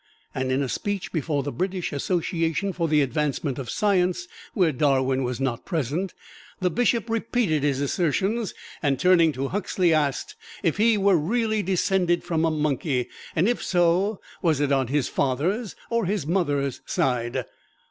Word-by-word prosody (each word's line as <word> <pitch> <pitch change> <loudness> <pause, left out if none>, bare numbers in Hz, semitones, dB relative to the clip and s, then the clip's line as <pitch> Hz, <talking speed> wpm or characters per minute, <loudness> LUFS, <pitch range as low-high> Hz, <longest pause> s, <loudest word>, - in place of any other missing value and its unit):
And 130 0 -1
in 135 +2 +1
a - - -2
speech 200 +7 -3
before 150 -3 -1
the 145 - -3
British 185 -1 -2
Association 170 +4 -1
for 170 -2 -1
the 150 -1 +3
Advancement 140 0 -1
of 125 -3 -5
Science, 180 -2 +1 0.3
where 180 -5 +3
Darwin 135 -1 +2
was 125 0 -2
not 130 -3 -2
present, 165 +3 -2 0.4
the 180 -1 +1
Bishop 235 +2 +1
repeated 225 - 0
his 140 -1 0
assertions, 190 - 0 0.3
and 140 -4 +1
turning 175 -3 +5
to 135 +1 -3
Huxley, 185 -3 +1
asked 155 - 0 0.3
if 165 -2 +1
he 220 +1 +4
were 195 -2 +4
really 220 +6 0
descended 180 -1 +1
from 165 -1 0
a - - +3
monkey, 145 -4 -1 0.3
and 165 +5 +3
if 245 - 0
so, 180 +3 +2 0.2
was 160 -5 +2
it 145 -1 +1
on 135 -2 +2
his 140 0 0
father's 175 - -1 0.2
or 230 -5 +1
his 200 -5 -1
mother's 145 -6 0
side! 120 -2 0
165 Hz, 160 wpm, -25 LUFS, 140-190 Hz, 0.4 s, turning